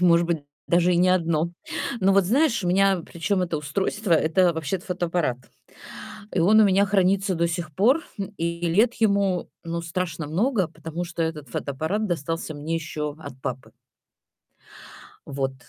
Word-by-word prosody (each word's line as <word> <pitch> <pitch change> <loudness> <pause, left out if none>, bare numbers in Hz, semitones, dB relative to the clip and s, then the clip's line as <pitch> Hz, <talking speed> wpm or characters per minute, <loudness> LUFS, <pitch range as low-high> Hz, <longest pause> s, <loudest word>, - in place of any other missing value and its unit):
и, - - +3
может 170 -1 +5
быть, 170 -1 0 0.3
даже 175 +1 +3
и - - +2
не 180 +1 +4
одно. 170 -2 +1 0.5
Ну 195 +1 +4
вот, 195 -1 +4
знаешь, 235 - +2
у - - 0
меня 195 0 +3
причем 185 +3 -1
это 170 -3 -2
устройство- 190 +7 -2
это 165 +2 +4
вообще-то 160 +3 -3
фотоаппарат, 175 -7 -1 1.0
и - - +1
он 205 +6 +5
у 215 - +7
меня 195 0 +4
хранится 195 0 +2
до 170 0 +1
сих 170 -2 -4
пор, 245 - +3 0.2
м, 200 +1 -4
и 170 +1 -2
лет 220 +8 +3
ему, 200 -5 +1
ну, 170 0 -3
страшно 165 -2 -3
много, 195 - +1
потому 165 +2 -6
что 170 -1 -5
этот 155 -3 -4
фотоаппарат 160 - -2
достался 165 -1 -3
мне 155 +3 -3
еще 150 -2 -4
от 140 -4 -10
папы. 130 -1 -5 1.6
Вот. 135 -1 -2
175 Hz, 165 wpm, -24 LUFS, 160-195 Hz, 1.6 s, у